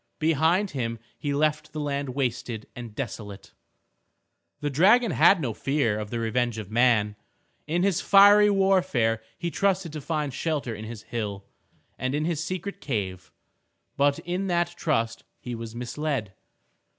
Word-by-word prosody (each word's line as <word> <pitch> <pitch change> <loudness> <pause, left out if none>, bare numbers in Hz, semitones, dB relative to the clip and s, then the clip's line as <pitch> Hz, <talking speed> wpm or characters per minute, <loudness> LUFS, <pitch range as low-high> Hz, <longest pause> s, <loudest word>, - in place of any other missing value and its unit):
Behind 165 +5 +2
him 115 -4 -3 0.2
he 145 - -2
left 155 +1 0
the 155 - -4
land 140 -3 -2
wasted 120 -4 -2
and 120 -3 -8
desolate. 105 -5 -7 1.1
The 145 -1 -2
dragon 210 - +5
had 195 - +5
no 125 -8 -2
fear 125 -5 0
of 105 -1 -5
the 120 - -3
revenge 120 0 0
of 105 -2 -7
man. 110 -3 +3 0.5
In 170 +3 +1
his 195 -2 +2
fiery 205 +1 +7
warfare 185 - +2 0.2
he 170 - -3
trusted 190 -4 0
to 155 - -5
find 150 -2 -2
shelter 145 -6 -2
in 110 0 -7
his 115 -1 -8
hill, 105 -4 -4 0.5
and 130 +2 -1
in 150 +1 0
his 165 -2 -1
secret 185 +3 -5
cave. 95 - -4 0.6
But 140 0 +3
in 180 +3 -3
that 175 -1 0
trust 115 -9 -1 0.2
he 125 - -6
was 115 -1 -7
misled. 125 -3 -3
140 Hz, 150 wpm, -26 LUFS, 115-170 Hz, 1.1 s, fiery